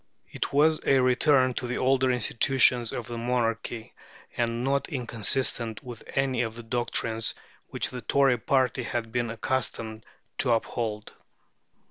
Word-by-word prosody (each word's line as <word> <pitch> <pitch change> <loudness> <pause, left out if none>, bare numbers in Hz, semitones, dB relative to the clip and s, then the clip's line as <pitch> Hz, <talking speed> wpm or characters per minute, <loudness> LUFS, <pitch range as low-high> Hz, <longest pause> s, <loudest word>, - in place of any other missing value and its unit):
It - - -3
was 155 +2 +3
a 135 - +4
return 130 +1 +4
to 125 - -3
the 125 - -2
older 130 0 +2
institutions 125 0 +3
of 120 - -4
the 120 -1 -5
monarchy, 115 -1 -2 0.4
and 120 0 -1
not 140 +1 0
inconsistent 120 - -1
with 120 -3 -9
any 135 -2 +1
of 115 -2 -3
the 120 - -8
doctrines 115 -1 -1 0.3
which - - -2
the 125 -1 -6
Tory 135 +1 +3
party 130 +1 +1
had 115 -1 -3
been 120 -1 -1
accustomed 115 -2 -2 0.4
to 120 - +3
uphold. 110 -2 -3
120 Hz, 140 wpm, -27 LUFS, 115-130 Hz, 0.4 s, a